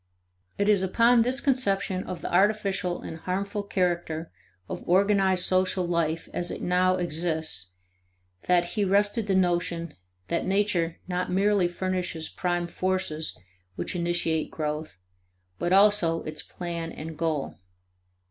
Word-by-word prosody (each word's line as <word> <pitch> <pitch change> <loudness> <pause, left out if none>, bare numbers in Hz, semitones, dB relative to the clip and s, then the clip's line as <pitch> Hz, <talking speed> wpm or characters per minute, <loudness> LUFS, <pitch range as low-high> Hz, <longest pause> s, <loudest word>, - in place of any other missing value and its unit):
It 200 - +1
is 205 -3 +4
upon 230 +5 +4
this 250 +3 +2
conception 200 -9 +1
of 180 - -6
the - - -5
artificial 195 -2 +1
and 160 - -6
harmful 200 +5 -2
character 175 -4 -1 0.4
of - - -5
organized 190 -1 +4
social 185 0 +2
life 165 -1 -1
as 175 0 -2
it - - -5
now 185 +1 +3
exists 160 - -2 0.7
2 - - -22
that 175 -1 +4
he 210 - +1
rested 205 +3 +2
the 195 - +2
notion 175 -3 0 0.3
that 170 - -1
nature 190 -4 +1
not 180 0 -2
merely 195 0 +3
furnishes 180 -2 -3
prime 175 -1 -1
forces 175 -3 -2 0.4
which - - -4
initiate 170 -2 0
growth 155 - -4 0.6
but 175 - -1
also 195 -4 +4
its 155 -1 -6
plan 170 -2 -5
and 160 +1 -7
goal. 155 -3 -2
180 Hz, 135 wpm, -27 LUFS, 170-195 Hz, 0.7 s, is